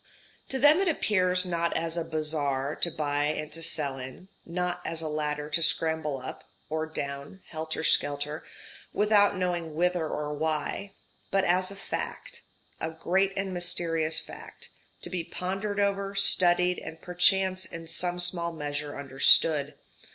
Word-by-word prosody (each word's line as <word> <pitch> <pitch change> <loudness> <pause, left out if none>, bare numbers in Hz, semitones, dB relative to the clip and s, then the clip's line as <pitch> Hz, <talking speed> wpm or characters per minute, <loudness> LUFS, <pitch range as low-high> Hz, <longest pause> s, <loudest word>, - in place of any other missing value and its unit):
To 265 - -1
them 295 +5 +5
it 390 - +1
appears 185 - +2
not 170 -1 -1
as 165 0 +1
a 170 - -1
bazaar 150 -3 -2
to 170 - +3
buy 145 -2 -1
and 155 0 -3
to 165 +2 -4
sell 145 -4 +2
in; 130 +9 -9 0.2
not 180 +1 -3
as 165 0 -2
a - - -3
ladder 150 -1 -3
to 165 - +2
scramble 160 -3 +1
up 130 - -8 0.3
(or 160 0 -2
down) 140 +3 -6
helter 160 0 -4
skelter 145 +1 +1 0.5
without 205 -1 +4
knowing 175 -4 -3
whither 175 -1 0
or 150 0 -4
why; 155 +6 -3 0.4
but 195 0 +1
as 185 0 +1
a 200 - -9
fact 195 - -5 0.4
a 160 - -2
great 190 +4 0
and 190 -1 -3
mysterious 170 -3 +2
fact - - -9 0.3
to 175 - +1
be 180 -3 -2
pondered 195 +4 -4
over, 200 0 -1
studied, 180 -2 +5
and 160 - -10
perchance 185 +1 +2
in 165 -1 -9
some 175 +2 0
small 175 -1 +1
measure 145 -2 -5
understood. 140 +2 +4
165 Hz, 150 wpm, -27 LUFS, 150-185 Hz, 0.5 s, them